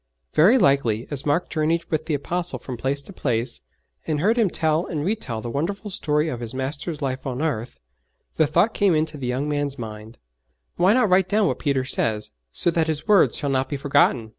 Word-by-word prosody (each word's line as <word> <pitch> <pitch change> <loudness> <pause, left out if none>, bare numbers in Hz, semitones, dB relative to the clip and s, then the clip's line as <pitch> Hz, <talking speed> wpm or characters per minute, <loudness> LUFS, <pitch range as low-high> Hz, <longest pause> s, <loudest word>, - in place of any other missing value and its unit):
Very 195 +12 +6
likely, 130 - +2
as 145 0 -4
Mark 145 +5 +1
journeyed 165 +2 0
with 155 -1 -1
the 155 - +1
Apostle 175 +5 -2
from 130 - -7
place 135 +4 -1
to 195 - -12
place, 120 -5 -2 0.5
and 155 -2 0
heard 210 +8 +3
him 225 -5 +2
tell 160 +1 0
and 155 -3 -3
retell 155 - -2
the 120 - -5
wonderful 195 - -3
story 150 -3 0
of 125 -7 -3
His 120 +1 -4
Master's 140 +4 -4
life 130 0 -3
on 130 -1 -3
earth, 135 -7 -2 0.6
the 155 - +3
thought 210 +9 +2
came 195 -5 +3
into 155 0 0
the 130 - -3
young 130 +4 -1
man's 145 -1 -1
mind, 110 -1 -8 0.6
'Why 185 +4 +4
not 245 -4 +3
write 185 0 +4
down 210 +1 +3
what - - -1
Peter 140 -4 0
says, 110 -5 -1 0.2
so 170 - +2
that 165 -1 +1
his 155 +3 -3
words 205 -3 +4
shall 145 -2 -1
not 130 0 0
be 145 - -2
forgotten?' 135 -5 +2
145 Hz, 210 wpm, -23 LUFS, 130-170 Hz, 0.6 s, Very